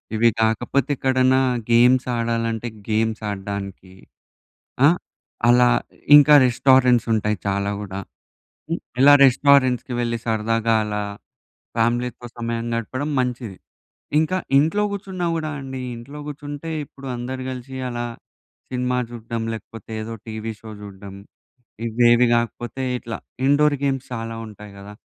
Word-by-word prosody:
ఇవి 115 +2 +5
కాకపోతే 120 +5 +1
ఎక్కడన్నా 130 0 +3 0.3
గేమ్స్ 125 +2 +5
ఆడాలంటే 115 0 -1 0.2
గేమ్స్ 110 +1 0
ఆడడానికి. 100 -1 -6 0.9
ఆ! - - +9 0.6
అలా. 125 0 +6 0.5
ఇంకా 150 +1 +7
రెస్టారెంట్స్ 125 -1 +4
ఉంటాయి 105 -1 0
చాలా 100 0 0
గూడా. 100 -2 -6 0.7
హ్మ్, 165 +2 -2 0.2
ఇలా 145 +2 +8
రెస్టారెంట్స్‌కి 130 -2 +4
వెళ్ళి, 120 -1 -1
సరదాగా 115 0 +1
అలా 105 0 -2 0.7
ఫ్యామిలీతో 120 +1 0
సమయం 115 0 -3
గడపడం 130 +6 -3
మంచిది. 120 -5 -3 0.6
ఇంకా 160 +4 +1 0.2
ఇంట్లో 165 +9 +2
కూర్చున్నా 190 -3 -4
గూడా 155 -1 -3
అండి, 130 -1 -6 0.2
ఇంట్లో 140 +6 -10
కూర్చుంటే 145 +1 -7
ఇప్పుడు 135 0 -13
అందరూ 130 +2 -5
కలిసి 130 +1 -7
అలా 120 -1 -3 0.6
సినిమా 125 0 -1
చూడ్డం 115 -1 -5
లేకపోతే, 115 -1 -11
ఏదో 115 +1 -6
టీవీ 110 0 -5
షో 110 - -10
చూడ్డం. 100 -1 -10 0.7
ఇవేవి 120 +1 +4
కాకపోతే 120 +2 -2 0.2
ఇట్లా 115 -1 -6 0.3
ఇండోర్ 145 +1 +4
గేమ్స్ 135 -2 -1
చాలా 115 -1 -4
ఉంటాయి 105 -1 -12
గదా! 100 +1 -10
120 Hz, 120 wpm, -22 LUFS, 110-130 Hz, 0.9 s, ఆ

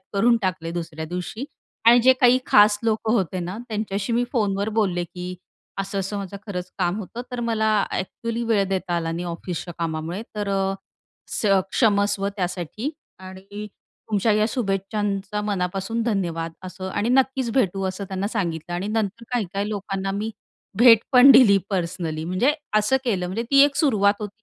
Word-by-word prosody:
करून 235 +4 +4
टाकले 185 -3 -2
दुसऱ्या 165 -2 -5
दिवशी 180 +8 -5 0.4
आणि 235 +1 +8
जे 260 +2 +7
काही 250 0 +6
खास 205 0 +6
लोकं 220 0 +1
होते 185 -5 0
ना, 180 +4 -5
त्यांच्याशी 210 -1 -2
मी 240 +1 +2
फोनवर 205 -3 0
बोलले 175 -4 0
की, 180 +1 -7 0.4
"असं-असं 195 +1 -3
माझं 200 0 -6
खरंच 180 -2 -5
काम 180 +2 0
होतं 225 +4 -6
तर 250 -1 -4
मला 220 -1 +2 0.2
ऍक्च्युली 230 +5 -4
वेळ 220 -4 +2
देता 190 -2 -1
आला 165 -1 -2
नाही 175 +2 -4
ऑफिसच्या 175 0 -5
कामामुळे 165 +4 -3
तर 205 -1 -2
अ, 195 0 0 0.5
स - - -4 0.3
क्षमस्व 200 -3 +2
त्यासाठी 180 - -3 0.3
आणि 190 +3 -9 0.4
तुमच्या 210 +1 +2
या 210 0 +3
शुभेच्छांचा 200 -2 -2
मनापासून 195 +3 -2
धन्यवाद" 170 -7 -2
असं 185 +1 -6
आणि 205 +4 -1
नक्कीच 265 -1 +2
भेटू 195 -6 +1
असं 185 +2 -5
त्यांना 190 +1 -2
सांगितलं 175 -6 -3
आणि 185 +4 -3
नंतर 220 +1 -2
काही-काही 200 -3 -1
लोकांना 195 -2 -3
मी 215 +2 -2 0.5
भेट 235 -1 +8
पण 255 +2 +9
दिली 235 -6 +7
पर्सनली, 170 -4 -2
म्हणजे 185 - +2 0.3
असं 215 +5 +2
केलं, 195 -7 0
म्हणजे 190 +6 -3
ती 275 0 +7
एक 285 -1 0
सुरुवात 210 - +3
होती. 210 +1 -8
200 Hz, 160 wpm, -23 LUFS, 180-220 Hz, 0.5 s, पण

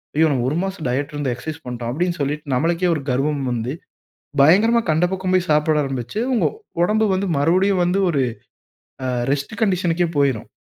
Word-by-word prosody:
"ஐயோ 160 +1 +4
நம்ம 125 -3 0
1 155 - -1
மாசம் 190 -6 -5
டயட் 140 +4 -2
இருந்து 145 -3 -2
எக்சர்சைஸ் 155 +5 -7
பண்ணிட்டோம்," 120 -1 -4
அப்படீன்னு 175 +3 -1
சொல்லிட்டு 145 0 -3
நம்மளுக்கே 170 +6 +1
ஒரு 145 - -4
கர்வம் 140 +2 0
வந்து, 120 +3 -2 0.7
பயங்கரமா 220 +9 +5
கண்ட 160 +3 +2
பக்கம் 185 0 -1
போய் 180 -2 +1
சாப்பிட 150 0 +3
ஆரம்பிச்சு, 135 - -4
உங்க 230 - +2 0.4
உடம்பு 215 +4 +2
வந்து 190 0 -1
மறுபடியும் 185 +5 +2
வந்து 185 +3 +1
ஒரு, 140 -4 +1 0.8
அ - - -1 0.3
ரெஸ்ட் 140 +8 -3
கண்டிஷனுக்கே 175 -4 +1
போயிரும். 135 -6 +1
155 Hz, 170 wpm, -21 LUFS, 140-185 Hz, 0.8 s, பயங்கரமா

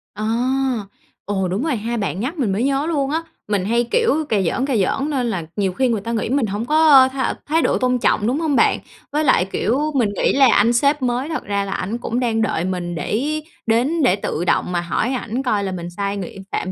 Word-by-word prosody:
À! 215 - -4 1.0
Ồ, 190 -2 -1
đúng 195 +8 -2
rồi 310 -4 0
ha, 230 +2 -3
bạn 200 -2 -2
nhắc 285 +9 -3
mình 235 -8 0
mới 200 +5 0
nhớ 275 +2 +1
luôn 280 -4 0
á, 325 +1 -1 0.2
mình 200 -3 0
hay, 235 +3 +1
kiểu, 385 -10 +2
cà 210 -3 +2
giỡn, 190 +9 0
cà 275 -3 -1
giỡn 270 +8 0
nên 255 -5 -1
là 175 -7 -3
nhiều 195 -3 0
khi 260 +6 +1
người 225 -4 0
ta 230 +3 -4
nghĩ 220 -1 -1
mình 265 -2 +1
hổng 205 +3 -3
có, 315 +4 +3
ơ, 265 -2 +8
th 270 - -11 0.3
thái 320 +2 +1
độ - - +2
tôn 250 0 +1
trọng, 210 - +1
đúng 260 +5 0
hông 315 -4 0
bạn? - - +3 0.3
Với 305 +2 0
lại, 255 -9 +3
kiểu, 280 +9 0
mình 230 -6 +2
nghĩ - - +2
là 270 -3 +5
anh 230 +4 +4
sếp 280 +4 +2
mới 250 +3 -1
thật 320 - -3
ra 200 -1 -1
là 195 - -5
ảnh 210 +6 -3
cũng 240 0 -3
đang 230 -3 0
đợi 180 -6 0
mình 175 -2 -3
để 290 - -1 0.2
đến 255 +9 +1
để 220 -8 +4
tự 175 -4 -3
động 180 - +1
mà 175 -1 0
hỏi 215 +8 -1
ảnh 250 +1 -3
coi 210 -5 0
là 190 - -2
mình 175 -1 -5
sai 200 +3 -3
ng 195 - -3 0.3
phạm 185 - -2
235 Hz, 250 wpm, -20 LUFS, 200-275 Hz, 1.0 s, ơ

